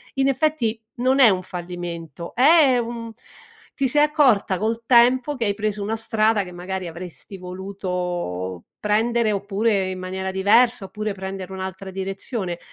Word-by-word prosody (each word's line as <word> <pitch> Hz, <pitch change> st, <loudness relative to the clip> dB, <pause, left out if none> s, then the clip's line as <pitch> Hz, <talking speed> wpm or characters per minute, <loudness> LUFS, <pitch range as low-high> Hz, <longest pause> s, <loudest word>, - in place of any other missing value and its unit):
in 270 Hz, 0 st, +2 dB
effetti, 265 Hz, -5 st, 0 dB, 0.2 s
non 260 Hz, +3 st, +2 dB
è 255 Hz, -4 st, +8 dB
un 185 Hz, -2 st, +1 dB
fallimento, 175 Hz, -3 st, -7 dB
è 280 Hz, 0 st, +6 dB
un 230 Hz, -1 st, -4 dB, 0.6 s
ti 275 Hz, -1 st, +1 dB
sei 295 Hz, +4 st, +4 dB
accorta 265 Hz, -, +3 dB
col 225 Hz, +2 st, -1 dB
tempo 250 Hz, +4 st, +4 dB
che 240 Hz, -4 st, -2 dB
hai 200 Hz, -1 st, 0 dB
preso 210 Hz, -1 st, -2 dB
una 215 Hz, +2 st, -1 dB
strada 220 Hz, -2 st, +2 dB
che 180 Hz, -, -10 dB
magari 185 Hz, +1 st, -5 dB
avresti 175 Hz, +3 st, -8 dB
voluto 180 Hz, -, -4 dB
prendere 220 Hz, +1 st, +1 dB
oppure 200 Hz, 0 st, 0 dB
in 185 Hz, -, -5 dB
maniera 190 Hz, +1 st, -4 dB
diversa, 205 Hz, +4 st, +3 dB
oppure 210 Hz, +2 st, -4 dB
prendere 190 Hz, -1 st, -6 dB
un'altra 190 Hz, 0 st, -6 dB
direzione. 190 Hz, 0 st, -4 dB
200 Hz, 145 wpm, -22 LUFS, 185-235 Hz, 0.6 s, è